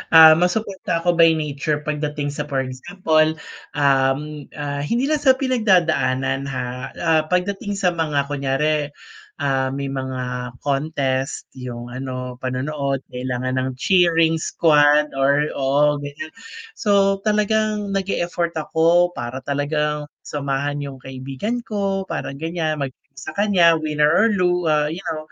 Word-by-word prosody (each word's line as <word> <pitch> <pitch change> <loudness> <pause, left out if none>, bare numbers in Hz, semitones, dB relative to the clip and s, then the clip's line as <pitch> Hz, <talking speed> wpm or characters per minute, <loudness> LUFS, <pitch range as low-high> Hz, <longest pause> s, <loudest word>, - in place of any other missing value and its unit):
Ah, 160 0 +10
masuporta 180 -2 -1
ako 175 -1 +1
by 165 -1 +6
nature 150 0 -2
pagdating 150 -1 -2
sa 145 0 -5
for 135 -2 -1
example, 155 +4 0 0.4
um, 140 +1 +1
ah, 145 -1 -4
hindi 235 - -1
lang 300 +1 +1
sa 265 -3 +5
pinagdadaanan 170 - +1
ha, 130 -2 -3 0.3
ah, 160 -2 +2
pagdating 200 +4 -1
sa 190 -3 +1
mga 155 -4 0
kunyari, 145 +2 0 0.5
ah, 135 -2 0
may 140 0 -3
mga 125 -2 -4
contest, 135 -2 -1
'yung 120 -2 -7
ano 125 -1 -5
panonood 135 +1 -2
kailangan 125 0 -3
ng 130 - -1
cheering 165 -3 +3
squad 150 -2 +4
or 140 +2 +2
oo, 145 +2 +2
ganiyan, 145 +2 -7 0.4
so 195 -1 +2
talagang 210 -1 +1
nag-e-effort 175 -3 -1
ako 170 +3 +3
para 120 +2 -5
talagang 150 +1 -1 0.2
samahan 145 0 -2
'yung 140 -1 -7
kaibigan 135 - -4
ko 195 -2 -1
para, 155 -4 -4
ganiyan, 160 +1 -2
mag 135 - -2 0.3
sa 135 - -7
kanya 185 -5 +5
winner 150 -1 +1
or 215 +8 +4
lo 180 -2 +1
ah, 150 -1 +2
yaw 170 -3 -4
150 Hz, 130 wpm, -21 LUFS, 135-175 Hz, 0.5 s, Ah